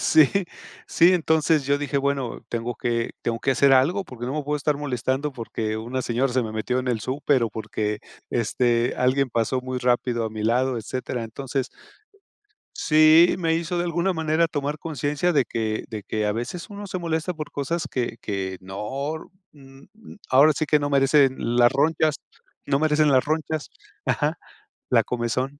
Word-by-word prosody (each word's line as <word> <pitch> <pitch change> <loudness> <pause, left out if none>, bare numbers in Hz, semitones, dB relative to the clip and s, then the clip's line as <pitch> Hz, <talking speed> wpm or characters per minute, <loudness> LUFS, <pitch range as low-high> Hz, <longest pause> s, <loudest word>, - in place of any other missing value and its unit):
sí, 155 -3 +5 0.6
sí, 175 +2 +5
entonces 160 -3 +2
yo 140 0 +2
dije, 140 -1 -1
bueno, 140 -3 -2
tengo 120 0 -3
que 115 0 -1
tengo 115 -1 -1
que 135 - 0
hacer 140 0 +4
algo 170 +10 +3
porque 120 -1 -7
no 135 - -3
me 150 - -1
puedo 150 +1 -1
estar 150 0 0
molestando 135 +1 -2
porque 110 -2 -4
una 125 +4 -3
señora 125 +2 0
se 130 -1 +2
me 110 -1 -5
metió 125 +3 -1
en 130 0 -2
el 115 -3 0
súper 135 +2 0
o 115 - -3
porque, 105 -1 -3 0.3
este, 120 +1 +1
alguien 130 +1 +1
pasó 115 +3 0
muy 130 0 -4
rápido 120 -1 +1
a 110 - -3
mi 110 -1 -5
lado, 125 +3 +1
etcétera. 120 +2 -4
Entonces, 130 +3 -4 1.0
sí, 155 +2 +5
me 165 -2 +1
hizo 170 +1 -2
de 175 - 0
alguna 175 +2 0
manera 160 +1 +1
tomar 145 -1 -3
conciencia 150 +2 -1
de 140 -5 +3
que 110 -1 -2
de 105 -3 -6
que 110 -1 -2
a 105 - +1
veces 120 - -5
uno 205 0 -8
se 185 - -4
molesta 165 +1 -2
por 155 -1 -7
cosas 155 +4 -2
que 120 -2 -3
que 95 -2 -3
no 130 +11 -5 0.2
n 135 -1 -16
n 220 -1 -14
ahora 145 +4 +6
sí 155 - -1
que, 150 0 +3
no 145 0 -2
merecen 135 -1 +4 0.2
las 120 0 +6
ronchas 155 +1 +2 0.5
no 140 0 +1
merecen 155 -1 +3
las 130 -1 +3
ronchas, 155 0 -2 0.4
ajá, 150 +1 0 0.5
la - - +4
comezón. 125 +4 -2
135 Hz, 180 wpm, -24 LUFS, 120-155 Hz, 1.0 s, ahora